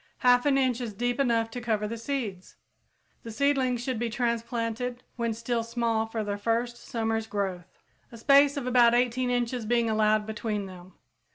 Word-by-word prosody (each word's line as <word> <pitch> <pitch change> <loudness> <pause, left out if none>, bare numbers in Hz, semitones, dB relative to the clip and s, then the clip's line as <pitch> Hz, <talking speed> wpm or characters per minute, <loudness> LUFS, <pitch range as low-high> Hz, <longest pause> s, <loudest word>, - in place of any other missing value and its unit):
Half 245 +2 +5
an 275 -1 +4
inch 255 -2 +1
is 225 -4 -5
deep 245 +4 -1
enough 230 -4 +1
to 245 - -5
cover 215 -3 -1
the 230 - -4
seeds. 230 -6 -4 0.7
The 230 - -9
seedlings 255 -1 +1
should 255 -3 -2
be 240 0 -1
transplanted 235 +1 -2
when 235 -1 -1
still 230 +1 -2
small 230 -1 -1
for 225 -1 -3
their 205 0 -3
first 235 +3 0
summer's 225 -2 -2
growth, 190 -4 -4 0.3
a 230 - -10
space 280 +4 +5
of 275 - -3
about 240 -2 +5
18 250 +1 +1
inches 245 0 -1
being 230 0 +1
allowed 215 0 +2
between 215 -1 -3
them. 185 -1 -12
235 Hz, 175 wpm, -27 LUFS, 220-245 Hz, 0.7 s, Half